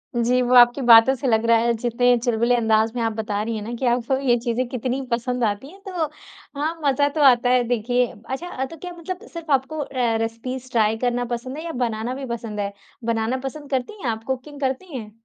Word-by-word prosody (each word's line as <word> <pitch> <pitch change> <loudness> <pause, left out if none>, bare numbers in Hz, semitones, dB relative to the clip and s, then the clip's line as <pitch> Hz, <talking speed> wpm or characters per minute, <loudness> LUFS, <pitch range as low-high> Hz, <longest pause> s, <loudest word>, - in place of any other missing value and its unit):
जी, 245 +2 +2
वो 250 0 +1
आपकी 245 +2 +7
बातों 230 +3 +8
से 265 - -3
लग 225 -1 +2
रहा 230 0 +5
है 235 +1 +2
जितने 245 +1 +2
चुलबुले 235 0 +2
अँदाज 220 -1 +2
में 240 - -1
आप 225 - +1
बता 210 -1 -2
रही 230 0 -3
हैं 215 - -4
ना 230 +3 -5
कि 255 +2 -3
आप 245 -1 -1
को 265 - +2
ये 240 -1 +5
चीज़ें 240 +1 -1
कितनी 255 +2 -2
पसंद 245 +1 -1
आती 210 +5 -1
हैं 390 - -16
तो 355 -4 -1 0.5
हाँ, 320 +3 -2
मज़ा 285 +1 +3
तो - - +2
आता 245 0 +3
है 250 0 +4
देखिए। 245 +1 +1 0.2
अच्छा 270 -1 -3
तो 330 - -10
क्या 360 +3 -7
मतलब 365 +5 -7
सिर्फ़ 330 -3 -6
आपको 275 +3 +1
अ, 290 - -3 0.4
रेसिपीज़ 255 +3 -5
ट्राई 220 -1 +2
करना 245 0 0
पसंद 255 +4 -5
है 315 - -6
या 330 - -3
बनाना 225 +2 -3
भी 275 - -5
पसंद 220 -3 -7
है? 200 0 -2 0.3
बनाना 230 +2 0
पसंद 290 +1 -8
करती 260 +9 -1
हैं - - -7
आप 220 0 -6
कुकिंग 265 +2 -4
करती 270 +4 -2
हैं? 215 -3 -8
245 Hz, 230 wpm, -22 LUFS, 230-270 Hz, 0.5 s, बातों